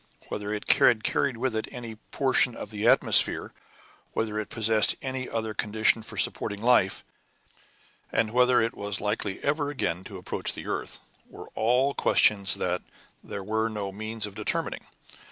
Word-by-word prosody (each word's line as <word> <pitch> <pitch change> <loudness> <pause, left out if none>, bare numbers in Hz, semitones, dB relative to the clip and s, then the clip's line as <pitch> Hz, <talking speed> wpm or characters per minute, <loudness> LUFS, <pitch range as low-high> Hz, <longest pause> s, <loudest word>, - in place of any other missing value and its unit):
Whether 105 0 -4
it 105 -1 -4
had 115 -3 +5
carried 135 -4 0
with 125 -1 -1
it 110 - -2
any 120 -2 -7
portion 125 +2 +1
of 105 - -8
atmosphere, 105 +3 +3 0.6
whether 110 -1 -1
it 110 - -5
possessed 110 -1 +3
any 130 -1 -4
other 110 -1 -3
condition 110 +2 +2
for 110 - -9
supporting 105 -1 0
life, 115 -4 +3 1.1
and 110 -1 +1
whether 125 0 +4
it 115 - -2
was 100 0 -4
likely 105 -1 -2
ever 145 0 0
again 95 - -2
to 100 - -8
approach 90 - -3
to - - -9
the - - -8
earth, - - -3 0.3
were - - -11
all 125 +5 +2
questions 100 -6 +4
that 90 0 -1 0.4
there 100 - -6
were 110 +2 0
no 105 -3 -4
means 110 +2 -2
of 105 - -7
determining. - - -3
110 Hz, 160 wpm, -27 LUFS, 105-120 Hz, 1.1 s, had